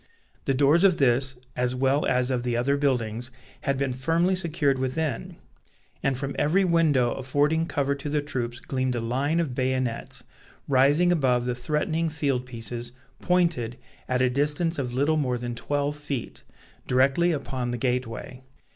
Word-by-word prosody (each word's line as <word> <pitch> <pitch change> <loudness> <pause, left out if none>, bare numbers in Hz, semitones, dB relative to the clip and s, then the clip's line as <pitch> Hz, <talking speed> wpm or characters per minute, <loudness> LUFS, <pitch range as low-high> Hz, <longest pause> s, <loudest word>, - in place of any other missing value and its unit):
The 135 - +1
doors 145 +6 +4
of 185 -3 +5
this, 130 0 +2 0.2
as 125 0 0
well 135 +3 +2
as 125 0 +1
of 125 -2 0
the 120 -1 -1
other 135 +4 +2
buildings, 125 -4 0 0.4
had 140 -2 +1
been 135 -1 -1
firmly 165 +8 +1
secured 155 -6 0
within; 130 0 -2 0.7
and 135 -2 0
from 140 +1 -4
every 185 +6 +3
window 155 -8 +3
affording 145 +5 +1
cover 140 -3 0
to 140 +1 -5
the 150 +1 +1
troops 120 -4 -3
gleamed 130 -2 -2
a - - -1
line 135 +8 0
of 155 -7 -1
bayonets, 130 -2 -2 0.4
rising 145 +6 +4
above 130 -7 +2
the 125 - 0
threatening 155 +6 -1
field 140 -5 -1
pieces, 120 0 -5 0.3
pointed, 170 -10 +1 0.3
at 130 0 +2
a 130 - +3
distance 150 +4 0
of 125 -2 -3
little 145 +4 +2
more 125 -4 0
than 120 0 -4
twelve 145 +4 -2
feet, 145 -4 -5 0.4
directly 135 +7 +3
upon 130 -5 -3
the 120 - -2
gateway. 125 0 -3
135 Hz, 160 wpm, -26 LUFS, 125-150 Hz, 0.7 s, of